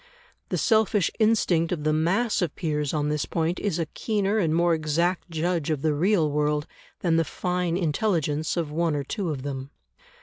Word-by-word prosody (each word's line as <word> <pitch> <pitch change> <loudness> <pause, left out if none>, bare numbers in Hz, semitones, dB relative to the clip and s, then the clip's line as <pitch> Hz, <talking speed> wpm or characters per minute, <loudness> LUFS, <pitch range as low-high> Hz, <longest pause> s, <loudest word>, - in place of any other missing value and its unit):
The - - -1
selfish 220 -4 +2
instinct 195 -7 +2
of 165 -4 -2
the 155 0 +2
mass 190 +10 +1
of 170 -4 -1
peers 150 -4 -1
on 150 -1 0
this 150 -1 -1
point 165 +1 -1
is 200 -6 -1
a 165 - 0
keener 210 +3 -1
and 165 -6 +1
more 170 0 +3
exact 165 +4 0
judge 165 -1 -1
of 150 -3 -1
the 155 -1 +2
real 165 0 +2
world 150 0 0 0.4
than 165 -2 +2
the 165 - +3
fine 180 +1 -1
intelligence 160 -3 0
of 160 -3 -1
one 165 0 0
or 145 - -1
two 180 +6 -3
of 140 -4 -4
them. 135 -1 -5
165 Hz, 190 wpm, -25 LUFS, 150-180 Hz, 0.4 s, more